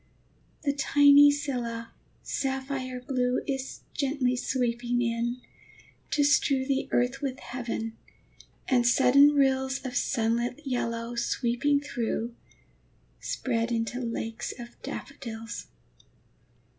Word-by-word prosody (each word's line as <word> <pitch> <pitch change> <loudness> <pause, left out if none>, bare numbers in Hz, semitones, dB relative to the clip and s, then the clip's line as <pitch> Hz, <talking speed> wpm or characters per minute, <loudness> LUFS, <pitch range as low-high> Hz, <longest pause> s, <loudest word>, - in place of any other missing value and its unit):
The 280 -2 +1
tiny 285 0 +7
scilla, 245 -5 -3 0.3
sapphire 265 -1 -3
blue, 250 0 0
Is 270 -1 -4
gently 270 -3 0
sweeping 245 -1 -1
in, 240 +1 -1 0.7
to 295 - +2
strew 275 -2 +3
The 270 0 -1
earth 250 +3 +1
with 265 -1 -3
heaven; 235 -4 -4 0.7
and 245 -2 +3
sudden 275 +4 +6
rills 265 -1 +2
Of 250 -1 -4
sunlit 235 +1 0
yellow, 235 -2 -2
sweeping 245 +4 +1
through, 235 -4 -3 0.9
Spread 235 -2 -1
into 230 +1 -1
lakes 230 -1 -4
of 240 -1 -8
daffodils. 230 -5 -7
250 Hz, 100 wpm, -28 LUFS, 235-275 Hz, 0.9 s, tiny